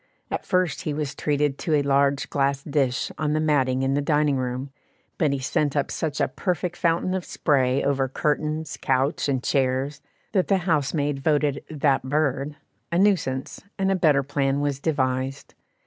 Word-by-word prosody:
At - - -3
first 180 -4 +1
he 150 - -3
was 150 -1 -3
treated 145 -1 0
to 160 - +1
a 145 - +2
large 140 0 +2
glass 140 -1 +1
dish 135 -4 0
on 150 -1 0
the 155 - +1
matting 135 -4 +2
in 135 +1 +1
the 145 - +1
dining 150 -1 +2
room, 130 +2 -3 0.5
but 155 -4 +3
he 140 - 0
sent 140 +2 0
up 140 - 0
such 155 -3 -2
a - - +2
perfect 180 -2 -2
fountain 170 +2 +1
of 190 -1 -2
spray 135 -5 +1
over 140 -1 +1
curtains, 150 +2 -2
couch, 135 +3 +1
and 130 -2 0
chairs, 135 +2 0 0.3
that 190 -4 +1
the 195 - +3
housemaid 145 -3 0
voted 145 -1 +1
"that 140 -3 +1
bird" 140 +1 -1 0.4
a 170 - +1
nuisance, 170 -10 +1 0.2
and 195 -1 +1
a - - +3
better 150 -6 +3
plan 140 0 0
was 145 -1 -1
devised. 135 -3 -1
145 Hz, 175 wpm, -24 LUFS, 135-155 Hz, 0.5 s, but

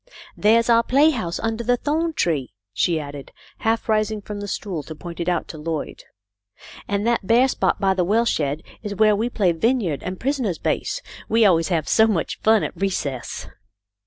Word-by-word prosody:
" 345 - -22
There's 230 +2 +5
our 230 -1 +5
playhouse 255 - +2
under 225 +1 -2
the 245 +1 +2
thorn 320 +5 -1
tree," 150 - -1 0.2
she 165 - +1
added, 145 -2 -8 0.3
half 225 0 0
rising 215 -1 +1
from 205 0 -7
the 205 - -5
stool 190 -4 -4
to 155 +3 -9
point 170 +3 -9
it 170 +1 -1
out 175 -2 -1
to 155 - -8
Lloyd. 160 0 -5 0.8
"And 205 +1 -1
that 235 -5 0
bare 240 +3 +5
spot - - 0
by 195 -1 +2
the 185 -1 +1
well 220 +6 +2
shed 150 -7 -1 0.2
is 205 -2 -5
where 215 +1 +4
we 225 +4 -1
play 200 -7 +2
vineyard 185 - 0
and 185 0 -5
prisoner's 255 - -1
base. - - -2 0.3
We 225 0 +4
always 165 -4 +4
have 165 -5 -1
so 220 0 +5
much 195 -7 -1
fun 220 -1 +4
at - - -4
recess." 150 -10 -3
205 Hz, 190 wpm, -22 LUFS, 170-230 Hz, 0.8 s, There's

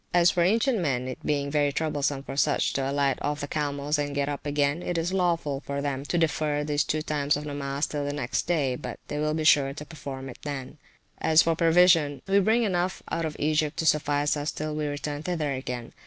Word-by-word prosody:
As 175 -1 +6
for 175 - 0
ancient 225 +6 +3
men, 130 -7 -1
it 130 - -7
being 140 -1 -1
very 145 -1 +2
troublesome 145 -2 -1
for 135 - -7
such 145 +1 +2
to 135 0 -1
alight 140 -1 +1
off 145 0 -1
the 145 - -3
camels, 145 0 -1
and 145 -1 -2
get 140 0 0
up 145 0 -4
again, 145 +2 +1
it 175 -1 -2
is 170 +3 -1
lawful 170 -7 0
for 140 0 -4
them 140 -1 -3
to 175 - -1
defer 155 -2 +1
these 150 0 +1
two 155 0 -1
times 145 -1 0
of 145 - -5
nomas 145 0 -2
till 145 -1 -3
the 145 - -2
next 145 -1 -2
day; 145 -7 +1
but - - -7
they 150 - -3
will 155 0 0
be 160 - -1
sure 140 -3 +4
to 150 - -7
perform 140 -4 -7
it 125 - -10
then. 140 0 -6 0.4
As 160 0 +5
for 165 0 +1
provisions, 165 -4 +4
we 195 +1 +4
bring 220 +4 +3
enough 180 -3 -1
out 165 - -1
of 155 -1 -4
Egypt 155 0 0
to 165 - -1
suffice 145 -1 +2
us 145 0 -2
till 155 0 -4
we 150 0 -2
return 145 0 -4
thither 155 -4 -1
again. 125 -3 -5
150 Hz, 230 wpm, -27 LUFS, 140-160 Hz, 0.4 s, As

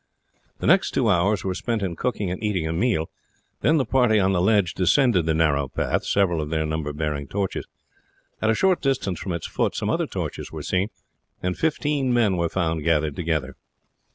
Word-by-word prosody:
The - - -5
next - - +3
two - - +2
hours 95 +3 +2
were 95 - -1
spent 110 +3 -2
in 90 -3 -2
cooking 105 -2 -2
and 90 - -5
eating 95 -7 0
a 80 - -2
meal; 85 -3 0 0.5
then 160 - +3
the 135 - +1
party 120 -3 +3
on 95 0 +2
the 90 -2 +1
ledge 100 -3 +3
descended 95 - +3
the 80 - +2
narrow 70 -4 +2
path, 65 - -1
several 90 -5 +2
of 75 - -4
their 80 -1 0
number 80 -1 -2
bearing 75 -2 -3
torches. 100 +2 -3 0.7
At 110 - +2
a 110 - +3
short 190 - +2
distance 125 - -1
from 95 - -4
its 85 - -4
foot - - -1
some - - -1
other - - 0
torches - - -5
were - - -6
seen, 95 +3 0 0.5
and 90 0 -1
fifteen 145 -4 0
men 115 -6 +3
were 85 -1 0
found 80 -4 -1
gathered 75 -2 +1
together. 75 -6 -2
90 Hz, 200 wpm, -24 LUFS, 80-110 Hz, 0.7 s, next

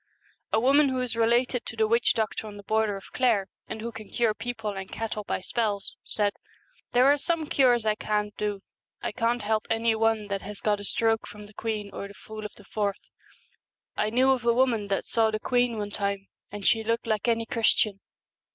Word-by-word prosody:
A 220 - +3
woman 275 +4 +5
who 260 -1 -1
is 250 -2 -2
related 240 +2 +2
to - - -6
the 220 -1 +3
witch 230 +2 +3
doctor 220 0 -1
on 205 -1 -9
the 205 - -10
border 215 -1 +1
of 195 - -13
Clare, 235 -6 +2 0.2
and 220 - -6
who 235 +1 -4
can 220 -3 -10
cure 230 -3 +1
people 220 -1 -4
and 195 -1 -7
cattle 220 -2 -3
by 195 - -2
spells, 205 -1 -1
said, 205 -1 +2 0.3
' - - -36
There 245 +1 +5
are 285 +1 +5
some 330 +1 0
cures 250 -6 +3
I 215 - +3
can't 210 -1 -2
do. 205 -2 -3 0.4
I - - -1
can't 235 0 0
help 215 +1 0
any 225 0 +2
one 220 -1 +1
that 195 -1 -2
has 205 +1 -8
got 210 -1 +1
a - - -7
stroke 225 +2 +1
from 210 0 -10
the 210 - -16
queen 210 -2 -3
or 200 - -5
the 200 - -13
fool 215 +1 -9
of 210 - -7
the 210 - -15
forth. 205 -2 -3 0.8
I 210 - +1
knew 255 +4 +4
of 255 -2 +1
a 235 0 +3
woman 240 -5 +2
that 195 -1 -1
saw 225 -1 +2
the 215 0 -2
queen 245 0 +1
one 205 -1 -3
time, 200 -1 -2 0.2
and 205 -1 -7
she 225 -1 +3
looked 230 +2 0
like 215 0 0
any 230 -1 +2
Chris 230 -1 +3
tian. 200 -3 +1
220 Hz, 225 wpm, -27 LUFS, 210-235 Hz, 0.8 s, woman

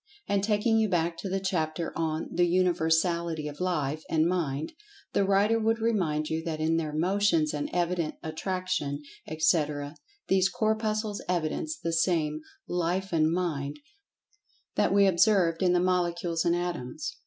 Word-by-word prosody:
And, 200 -1 +1
taking 220 +2 +2
you 220 -1 +2
back 170 -2 0
to 195 - -4
the 195 +1 0
chapter 165 -3 -2
on 160 -1 -2
"The 175 0 +3
Universality 170 -2 +1
of 145 0 -8
Life 155 -5 -1
and[Pg 160 -1 +2
94] - - +3
Mind," 160 - -2 0.4
the - - +3
writer 200 +3 +3
would 225 +1 +1
remind 180 -10 0
you 160 +1 -2
that 160 -2 -3
in 160 +1 +1
their 155 -2 -2
Motions 170 -1 +2
and 145 -1 -3
evident 175 -2 -1
Attraction, 160 -3 -3 0.2
etc., 150 -2 0 0.3
these 190 0 +3
Corpuscles 215 0 -1
evidence 180 - -1
the 165 - -3
same 160 -3 +1 0.3
"Life 180 +2 -1
and 160 -1 +3
Mind" 150 -5 -2 1.0
that - - +2
we 200 0 +5
observed 180 -3 +3
in 180 -1 +3
the 180 - +3
Molecules 175 -2 0
and 170 0 +3
Atoms. 175 - -4
175 Hz, 155 wpm, -28 LUFS, 155-190 Hz, 1.0 s, we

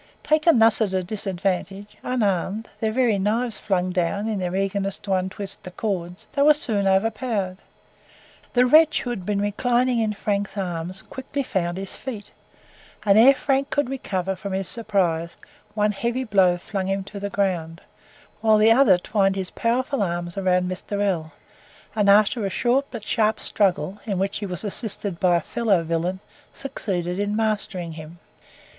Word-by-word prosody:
Taken 310 -1 +4
thus 225 0 +5
at 190 -3 0
disadvantage, 195 0 -2 0.2
unarmed, 210 -3 -1
their 220 -1 0
very 230 -4 +2
knives 220 +3 0
flung 185 -3 0
down 185 +4 -1
in 215 -3 -1
their 180 0 -2
eagerness 195 0 -1
to 195 - -3
untwist 190 +2 -3
the 185 - -8
cords, 180 -2 -4
they 280 - 0
were 300 +1 +7
soon 210 -9 -1
overpowered. 195 -1 0 0.9
The 250 0 +5
wretch 310 +4 +5
who 245 - -3
had 190 -7 -5
been 205 -1 0
reclining 240 +4 +1
in 215 -1 0
Frank's 205 0 -2
arms 180 0 -4
quickly 270 +1 -5
found 175 -7 -2
his 195 0 -6
feet, 225 -6 -7 0.7
and, 200 -1 +5
ere 250 +6 +8
Frank 275 0 0
could 285 -3 0
recover 190 -8 -2
from 200 0 -6
his 190 -1 -2
surprise, 185 -8 -1 0.4
one 210 0 +2
heavy 235 +5 -2
blow 190 -6 +3
flung 190 +1 -4
him 195 0 -1
to 205 +1 -9
the 200 0 -3
ground; 175 -5 -1 0.6
whilst 220 -1 +4
the 220 +1 +6
other 225 -6 +6
twined 195 +1 +1
his 190 -2 -4
powerful 255 +2 0
arms 175 -2 -2
round 180 -2 +1
Mr. 185 +2 -4
L, 175 -6 0 0.6
and, 205 -2 +3
after 210 +3 +4
a 195 - 0
short 255 +7 +1
but 225 -4 -7
sharp 220 -2 +1
struggle, 190 -1 0
in 200 -3 -1
which 195 +1 -1
he 205 - -4
was 180 0 -5
assisted 205 -3 -3
by 180 -2 +4
a 170 - +2
fellow 200 -2 +1
villain, 170 +3 -1 0.4
succeeded 180 -8 -3
in 205 +1 -1
mastering 210 -6 -1
him. 160 +1 -10
200 Hz, 165 wpm, -23 LUFS, 185-225 Hz, 0.9 s, ere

